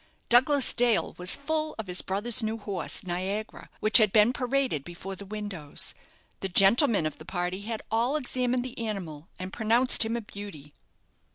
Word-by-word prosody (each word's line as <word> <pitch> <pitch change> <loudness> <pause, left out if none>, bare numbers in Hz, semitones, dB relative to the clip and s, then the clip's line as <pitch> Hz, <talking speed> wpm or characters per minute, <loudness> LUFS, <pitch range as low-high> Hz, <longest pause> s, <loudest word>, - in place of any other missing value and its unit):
Douglas 265 +3 +5
Dale 240 -2 +2
was 180 0 +3
full 310 +2 -2
of 220 - -5
his 180 -1 -2
brother's 210 +5 -1
new 220 0 -2
horse, 200 -5 -1
"Niagara," 190 +4 -4
which 215 +3 +6
had 215 -3 +3
been 215 +3 +4
paraded 255 - -1
before 175 +4 -8
the 200 +1 -10
windows. 200 -8 -2 0.5
The 195 - -4
gentlemen 200 - +4
of 155 - -4
the - - -10
party 180 +2 -3
had 220 +1 -5
all 235 +5 +1
examined 250 -3 -1
the 255 - -8
animal, 185 -8 -5
and 185 +1 -7
pronounced 235 +3 +3
him 225 +1 -2
a - - -4
beauty. 200 -9 -10
215 Hz, 170 wpm, -27 LUFS, 185-240 Hz, 0.5 s, which